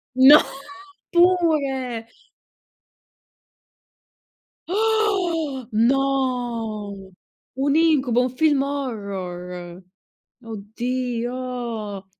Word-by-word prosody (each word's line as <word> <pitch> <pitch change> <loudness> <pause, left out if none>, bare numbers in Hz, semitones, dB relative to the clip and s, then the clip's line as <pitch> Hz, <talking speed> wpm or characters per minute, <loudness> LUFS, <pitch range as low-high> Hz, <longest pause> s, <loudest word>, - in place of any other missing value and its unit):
No! 265 +4 +9 0.7
Pure! 295 -10 +2 2.6
Oh! 370 - 0
No! 230 -5 -1 0.4
Un 280 +2 +1
incubo! 280 -7 +3
Un 250 - 0
film 295 -3 +3
horror! 185 -9 -5 0.6
Oddio! 235 -1 -4
255 Hz, 50 wpm, -22 LUFS, 220-285 Hz, 2.6 s, No